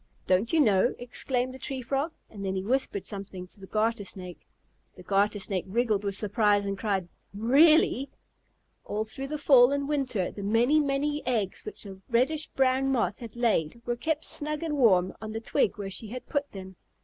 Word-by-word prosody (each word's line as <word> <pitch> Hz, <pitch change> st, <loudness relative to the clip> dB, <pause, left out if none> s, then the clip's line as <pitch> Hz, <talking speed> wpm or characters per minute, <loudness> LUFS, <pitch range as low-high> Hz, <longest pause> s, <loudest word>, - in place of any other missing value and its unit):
"Don't 185 Hz, +5 st, +2 dB
you 325 Hz, -, +3 dB
know?" 210 Hz, -4 st, +3 dB
exclaimed 250 Hz, +1 st, -1 dB
the 260 Hz, -, -10 dB
Tree 270 Hz, -1 st, -4 dB
Frog. 275 Hz, +6 st, -2 dB, 0.2 s
And 200 Hz, -2 st, -9 dB
then 190 Hz, 0 st, -2 dB
he 190 Hz, -, -2 dB
whispered 215 Hz, -4 st, -1 dB
something 195 Hz, -2 st, -6 dB
to 205 Hz, -, -16 dB
the 190 Hz, -, -11 dB
Garter 220 Hz, +1 st, 0 dB
Snake. 180 Hz, -2 st, -7 dB, 0.5 s
The -, -, -13 dB
Garter 205 Hz, +1 st, +1 dB
Snake 190 Hz, -2 st, -2 dB
wriggled 215 Hz, 0 st, 0 dB
with 200 Hz, -1 st, -2 dB
surprise 205 Hz, 0 st, +2 dB
and 200 Hz, 0 st, -2 dB
cried, 195 Hz, -3 st, -1 dB, 0.3 s
"Really?" 275 Hz, +4 st, +4 dB, 0.7 s
All 210 Hz, +1 st, -2 dB
through 245 Hz, +5 st, -4 dB
the 300 Hz, +2 st, -3 dB
fall 265 Hz, -3 st, +6 dB
and 280 Hz, 0 st, -1 dB
winter 260 Hz, -10 st, -1 dB
the 205 Hz, -, -8 dB
many, 235 Hz, +9 st, +3 dB
many 290 Hz, +1 st, 0 dB
eggs 220 Hz, -6 st, -1 dB
which 425 Hz, -1 st, -7 dB
the 190 Hz, -2 st, -10 dB
reddish 270 Hz, +6 st, +1 dB
brown 265 Hz, 0 st, +1 dB
Moth 215 Hz, -7 st, 0 dB
had 235 Hz, -2 st, -9 dB
laid 235 Hz, -5 st, 0 dB
were 240 Hz, -, -1 dB
kept 310 Hz, +5 st, -2 dB
snug 300 Hz, +2 st, 0 dB
and 315 Hz, -2 st, -2 dB
warm 190 Hz, -9 st, +4 dB
on 215 Hz, 0 st, -6 dB
the 225 Hz, -, -3 dB
twig 225 Hz, -2 st, 0 dB
where 195 Hz, -2 st, -5 dB
she 215 Hz, +4 st, -4 dB
had 250 Hz, +4 st, -7 dB
put 285 Hz, -1 st, -2 dB
them. 190 Hz, -2 st, -10 dB
230 Hz, 195 wpm, -28 LUFS, 200-270 Hz, 0.7 s, fall